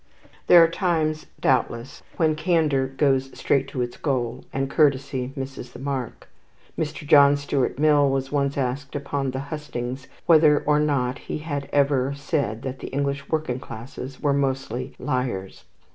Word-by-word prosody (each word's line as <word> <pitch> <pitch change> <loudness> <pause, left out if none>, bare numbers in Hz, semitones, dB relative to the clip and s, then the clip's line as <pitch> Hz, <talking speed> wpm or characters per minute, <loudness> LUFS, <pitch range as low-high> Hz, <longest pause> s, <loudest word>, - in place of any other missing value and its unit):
There 175 -1 +9
are - - +5
times 165 -3 -1
doubtless 120 -1 0 0.2
when 160 -2 +3
candour 155 -5 +1
goes 135 -1 +1
straight 135 -1 +1
to 130 -2 -2
its 120 0 -6
goal, 125 -4 -2
and 135 0 -1
courtesy 135 -3 +1
misses 135 -2 -7
the - - -9
mark. 135 -2 -4 0.5
Mr. 150 -1 -4
John 145 -1 +6
Stuart 140 -3 -1
Mill 145 -1 +4
was 135 0 -1
once 140 -1 0
asked 135 +2 -2
upon 140 -1 -2
the 130 +1 -3
hustings 130 -3 -5 0.2
whether 155 -3 +6
or 150 0 +3
not 140 -3 0
he - - -1
had 145 -3 -4
ever 140 -1 +2
said 140 -5 -2
that 130 0 -5
the - - -6
English 140 0 -2
working 155 -6 -1
classes 125 +3 -8
were 145 -1 +1
mostly 135 -2 -2
liars. 125 -9 -3
140 Hz, 155 wpm, -24 LUFS, 130-150 Hz, 0.5 s, There